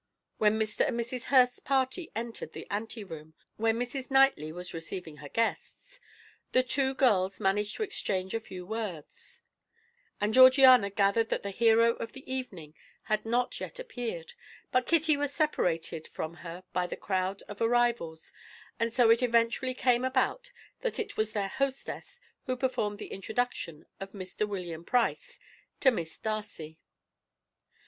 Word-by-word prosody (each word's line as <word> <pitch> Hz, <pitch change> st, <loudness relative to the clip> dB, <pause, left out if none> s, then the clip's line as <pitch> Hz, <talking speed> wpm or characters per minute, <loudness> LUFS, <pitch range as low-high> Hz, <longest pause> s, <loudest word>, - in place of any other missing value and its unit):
When 215 Hz, 0 st, +4 dB
Mr. 215 Hz, -1 st, +1 dB
and 235 Hz, -, -2 dB
Mrs. 240 Hz, +2 st, -4 dB
Hurst's 250 Hz, -2 st, +4 dB
party 270 Hz, +5 st, -1 dB
entered 230 Hz, +1 st, -5 dB
the -, -, -8 dB
ante 220 Hz, +2 st, -3 dB
room 160 Hz, -4 st, -10 dB, 0.2 s
where 225 Hz, +1 st, +3 dB
Mrs. 245 Hz, +4 st, -4 dB
Knightley 270 Hz, -, +4 dB
was 180 Hz, +2 st, -7 dB
receiving 165 Hz, -1 st, -6 dB
her 145 Hz, -1 st, -10 dB
guests, -, -, -3 dB, 0.5 s
the 255 Hz, -, +5 dB
two 265 Hz, +1 st, +1 dB
girls 200 Hz, -8 st, +2 dB
managed 205 Hz, +1 st, 0 dB
to -, -, -1 dB
exchange 190 Hz, -, -2 dB
a 225 Hz, -, 0 dB
few 185 Hz, -4 st, -9 dB
words, 205 Hz, -7 st, -6 dB, 0.8 s
and 210 Hz, +1 st, 0 dB
Georgiana 255 Hz, -4 st, +8 dB
gathered 200 Hz, +3 st, +2 dB
that -, -, -1 dB
the 200 Hz, -, -3 dB
hero 230 Hz, +2 st, +4 dB
of 230 Hz, -, -6 dB
the 265 Hz, -, -11 dB
evening 195 Hz, -, -5 dB, 0.3 s
had 215 Hz, 0 st, -1 dB
not 245 Hz, +2 st, 0 dB
yet -, -, -6 dB
appeared, 240 Hz, -, -5 dB, 0.4 s
but 255 Hz, -1 st, +2 dB
Kitty 320 Hz, -2 st, +4 dB
was 290 Hz, -1 st, 0 dB
separated 165 Hz, -, 0 dB
from 160 Hz, +2 st, -6 dB
her 175 Hz, +1 st, -8 dB
by 180 Hz, -1 st, 0 dB
the -, -, -6 dB
crowd 190 Hz, 0 st, -2 dB
of 205 Hz, +1 st, -10 dB
arrivals, 230 Hz, -9 st, +1 dB, 0.5 s
and 230 Hz, 0 st, +1 dB
so 235 Hz, -1 st, +5 dB
it 230 Hz, +2 st, +4 dB
eventually 235 Hz, +1 st, +2 dB
came 250 Hz, -1 st, +2 dB
about 260 Hz, -, 0 dB, 0.3 s
that 485 Hz, -, -2 dB
it 455 Hz, -, -4 dB
was 215 Hz, 0 st, 0 dB
their 200 Hz, -2 st, 0 dB
hostess 275 Hz, -, -3 dB, 0.3 s
who 255 Hz, -, 0 dB
performed 230 Hz, -5 st, -1 dB
the -, -, -8 dB
introduction 195 Hz, -6 st, -3 dB
of 195 Hz, 0 st, -7 dB
Mr. 195 Hz, +1 st, -3 dB
William 175 Hz, -5 st, -5 dB
Price 365 Hz, -, 0 dB, 0.4 s
to 265 Hz, -, +5 dB
Miss 165 Hz, -8 st, -4 dB
Darcy. 205 Hz, -8 st, -5 dB
225 Hz, 155 wpm, -30 LUFS, 190-255 Hz, 0.8 s, Georgiana